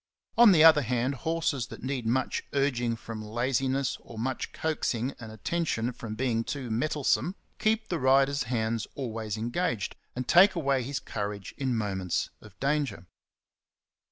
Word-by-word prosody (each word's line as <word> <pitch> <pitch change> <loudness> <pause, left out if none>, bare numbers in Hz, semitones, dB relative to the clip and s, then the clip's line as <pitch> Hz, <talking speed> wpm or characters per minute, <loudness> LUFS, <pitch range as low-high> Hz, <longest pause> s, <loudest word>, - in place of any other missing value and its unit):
On 235 -3 +8
the 160 -4 +6
other 160 -2 +8
hand, 125 +1 0
horses 155 -4 -1
that - - -10
need 130 -3 -2
much 130 +3 0
urging 125 -4 +1
from 115 -1 -7
laziness 130 +4 0
or 115 - -12
much 130 +3 -2
coaxing 135 -5 -1
and 115 -2 -8
attention 120 0 -1
from 110 -2 -6
being 115 -1 0
too 130 -2 -4
mettle 150 +6 -1
some, 180 +7 +2 0.2
keep 220 +1 +1
the 170 - -1
rider's 135 +1 +4
hands 115 -2 -1
always 110 -5 -4
engaged, 120 - -1 0.2
and 125 0 -4
take 190 +4 +7
away 140 -5 +1
his 130 +2 -3
courage 100 -4 -5
in 130 -3 -1
moments 95 -5 -1
of 105 -2 -16
danger. 140 - -1
130 Hz, 155 wpm, -28 LUFS, 115-145 Hz, 0.2 s, On